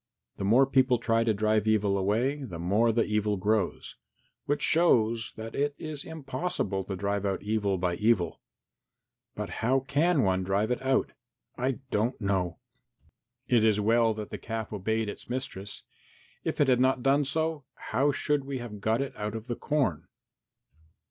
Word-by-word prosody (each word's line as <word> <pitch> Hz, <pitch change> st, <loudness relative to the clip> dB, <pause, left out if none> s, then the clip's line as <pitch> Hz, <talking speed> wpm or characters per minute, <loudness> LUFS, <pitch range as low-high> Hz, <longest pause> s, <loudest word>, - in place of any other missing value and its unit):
The -, -, -4 dB
more 120 Hz, +7 st, +5 dB
people 130 Hz, -2 st, +3 dB
try 115 Hz, 0 st, +1 dB
to 115 Hz, -, +2 dB
drive 110 Hz, 0 st, +1 dB
away 110 Hz, -, +5 dB, 0.7 s
evil, 135 Hz, -, -6 dB
the 90 Hz, -6 st, -7 dB
more 100 Hz, +7 st, +2 dB
the 115 Hz, +1 st, +2 dB
evil 105 Hz, -1 st, 0 dB
grows, 105 Hz, 0 st, -1 dB, 0.5 s
which 145 Hz, +1 st, 0 dB
shows 115 Hz, -9 st, +3 dB
that 110 Hz, +1 st, -7 dB
it 145 Hz, 0 st, 0 dB
is 155 Hz, -2 st, -6 dB
impossible 140 Hz, -, -3 dB
to 95 Hz, -, -4 dB
drive 100 Hz, +1 st, -1 dB
out 100 Hz, -1 st, -2 dB
evil 105 Hz, -2 st, 0 dB
by 90 Hz, -1 st, -1 dB
evil. 105 Hz, -7 st, +1 dB, 0.9 s
But -, -, -4 dB
how 130 Hz, +4 st, +2 dB
can 145 Hz, +3 st, +2 dB
one 95 Hz, -1 st, +1 dB
drive 100 Hz, +5 st, 0 dB
it 125 Hz, -, -1 dB
out? 130 Hz, 0 st, +1 dB, 0.4 s
I 130 Hz, +1 st, -2 dB
don't 115 Hz, +5 st, 0 dB
know. 95 Hz, -5 st, -1 dB, 0.9 s
It 120 Hz, -3 st, +4 dB
is 110 Hz, -2 st, +3 dB
well 115 Hz, +1 st, +3 dB
that 105 Hz, -1 st, -6 dB
the -, -, -5 dB
calf 110 Hz, -1 st, -5 dB
obeyed 110 Hz, +2 st, -1 dB
its 105 Hz, -, -8 dB
mistress; 115 Hz, -6 st, -5 dB, 0.6 s
if -, -, -3 dB
it 145 Hz, -, +4 dB
had 125 Hz, -2 st, +4 dB
not 130 Hz, -1 st, +2 dB
done 140 Hz, +2 st, +4 dB
so, 160 Hz, +1 st, -2 dB, 0.3 s
how 140 Hz, +3 st, +3 dB
should 145 Hz, 0 st, 0 dB
we 135 Hz, 0 st, -4 dB
have 115 Hz, -5 st, -7 dB
got 110 Hz, +5 st, +1 dB
it 140 Hz, -, -7 dB
out 105 Hz, +1 st, -4 dB
of 110 Hz, 0 st, -6 dB
the 120 Hz, -2 st, -3 dB
corn?" 135 Hz, -, -1 dB
115 Hz, 170 wpm, -28 LUFS, 105-135 Hz, 0.9 s, more